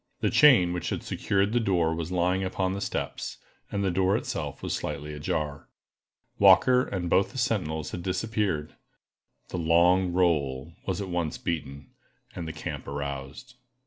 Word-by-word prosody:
The - - +1
chain 115 -13 +6
which 90 - -3
had - - -3
secured 100 +2 0
the 120 - +3
door 90 -7 +1
was 85 +1 -4
lying 90 +1 +1
upon 95 0 -1
the 100 - -4
steps, - - -4 0.3
and 100 -1 -1
the 95 - +1
door 95 +2 +2
itself - - -5
was - - -2
slightly 75 +1 -4
ajar. 75 0 -3 0.7
Walker 125 0 +6
and 90 -3 -3
both 95 +7 +2
the - - -8
sentinels 90 - -1
had 90 - -5
disappeared. 95 -4 -1 0.8
The 90 - -3
"long 85 +3 +4
roll" 80 -5 0
was 95 0 -1
at 100 - -4
once 85 -3 -2
beaten, 70 -4 -5 0.4
and 85 -2 -5
the - - -3
camp - - -6
aroused. 70 - -6
90 Hz, 160 wpm, -27 LUFS, 80-95 Hz, 0.8 s, chain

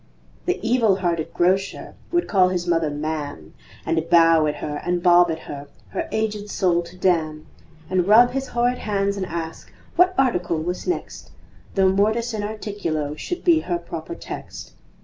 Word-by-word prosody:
The - - +1
evil 230 -4 +3
hearted 170 -4 -1
Grocer 190 +3 0 0.2
Would 345 0 +1
call 185 -3 +4
his 180 -1 -2
mother 165 -3 +1
"Ma'am," 145 - -5 0.3
And 160 -1 0
bow 165 -2 +5
at 150 - -1
her 150 -1 -5
and 175 0 -1
bob 175 0 +6
at 160 - -1
her, 145 0 -8 0.2
Her - - -4
aged 215 -1 -2
soul 180 -4 +1
to 175 +1 -12
damn, 160 -4 0 0.4
And 185 -1 0
rub 235 +4 +7
his 270 +1 -3
horrid 245 +1 0
hands 200 -1 -1
and 190 -2 -3
ask 165 -1 -6 0.2
What 365 +1 +4
article 180 -11 +1
was 175 +3 -4
next 360 - -4 0.5
Though 190 -1 +4
MORTIS 220 +5 +1
IN 215 - -2
ARTICULO 200 -8 -3
Should 355 - -5
be 335 -3 +5
her 175 - -2
proper 170 -1 -7
text. - - -8
180 Hz, 170 wpm, -22 LUFS, 165-215 Hz, 0.5 s, rub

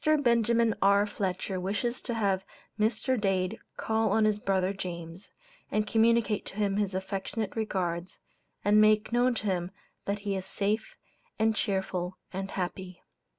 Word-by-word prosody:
Benjamin 235 -1 +3
R. 200 +1 +5
Fletcher 190 -2 -2
wishes 205 +6 -1
to 235 - -3
have 195 -4 +1 0.4
Mr. 235 +3 +1
Dade 195 +1 0 0.2
call 220 0 +1
on 220 -1 +4
his 210 -1 +2
brother 190 -1 +1
James, 175 -1 -7 0.4
and 215 0 +1
communicate 225 -1 +3
to - - -7
him 200 -1 0
his 200 -2 0
affectionate 195 +3 -3
regards, 185 -5 -2 0.5
and 210 +1 +6
make 215 0 +4
known 245 +1 +3
to 220 - -4
him 180 -3 0 0.4
that 200 +1 -1
he 200 -1 -1
is 190 - -3
safe, 205 +3 -2 0.4
and 220 0 +2
cheerful 190 -4 -1 0.2
and 195 +1 -3
happy. 185 -1 -5
200 Hz, 150 wpm, -29 LUFS, 190-220 Hz, 0.5 s, and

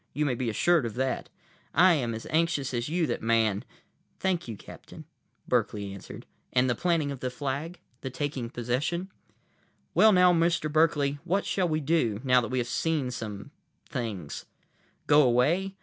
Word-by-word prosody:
You 150 +2 0
may 135 - +1
be 120 0 -2
assured 155 +5 +2
of 110 - -7
that. 130 +1 -2 0.5
I 180 0 +7
am 120 -7 -1
as 110 - -7
anxious 155 -5 +1
as 120 +2 -2
you 170 +1 +1
that - - -2
Man—" 110 -3 +2 0.6
"Thank 180 -5 -1
you, 110 -3 -6
Captain," - - -12 0.4
Berkeley 100 -2 0
answered. 100 - -10 0.3
"And 125 0 +3
the 120 - +2
planting 160 +1 0
of 140 - -6
the 125 - -2
flag? 145 +6 -4 0.2
The 130 - -4
taking 135 -3 -3
possession?" 135 +11 -2 0.8
"Well, 220 - +6
now, 180 -2 +6
Mr. 165 -2 +1
Berkeley, 145 -3 +2
what 195 +4 0
shall 185 -2 0
we 155 0 0
do, 135 -9 +1
now 125 -2 +4
that 115 - -3
we 130 - -2
have 120 -1 0
seen 145 0 -1
some—things? 115 - -7 0.6
Go 150 0 +6
away? 150 +10 +2
140 Hz, 165 wpm, -28 LUFS, 120-165 Hz, 0.8 s, I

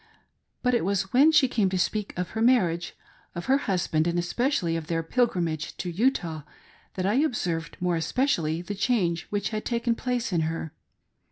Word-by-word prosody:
But 250 0 +2
it 240 - +2
was 195 +1 -1
when 285 +6 +6
she 300 -4 +5
came 215 -6 +1
to 185 - -1
speak 205 +2 -1
of 180 -1 -2
her 220 - -3
marriage, 185 -9 +2 0.4
of 175 - -5
her 270 +1 +3
husband, 170 -4 +1
arid 170 0 0
especially 175 - 0
of 165 -2 -4
their 165 -1 -1
pilgrimage 170 -7 -1
to 180 - -4
Utah 175 - 0 0.5
that 185 - -2
I 200 - +2
observed 175 - -2
more 180 -1 0
especially 165 - 0
the 205 - -4
change 195 -6 0
which 205 -2 -1
had 215 -1 -3
taken 235 0 0
place 245 -3 -2
in 170 - +2
her. 160 -1 -3
185 Hz, 180 wpm, -26 LUFS, 165-240 Hz, 0.5 s, when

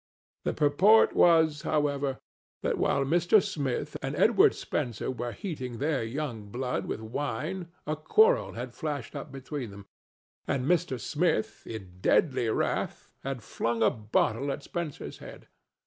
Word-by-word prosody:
The - - +1
purport 170 +9 +5
was, 160 -3 +5
however, 145 -3 0 0.5
that - - 0
while 140 - +2
Mr. 175 +7 +4
Smith 140 -8 -2
and - - -3
Edward - - +5
Spencer 120 +1 -2
were 120 -1 -4
heating 130 - -5
their 145 -2 0
young 115 -4 -4
blood 125 +3 -2
with - - -3
wine 145 +9 -3 0.2
a 155 - -1
quarrel 440 - +3
had - - -6
flashed 150 -5 -4
up 140 - -6
between 135 -2 -5
them, 100 0 -11 0.6
and 130 -2 0
Mr. 165 -5 +1
Smith, 155 -7 0
in 95 -5 -8
deadly 130 - +3
wrath, - - -2
had 135 -4 -4
flung 115 +1 -1
a 105 - +5
bottle 110 +4 0
at 140 - -5
Spencer's 170 -3 -5
head. - - -11
140 Hz, 145 wpm, -29 LUFS, 120-155 Hz, 0.6 s, purport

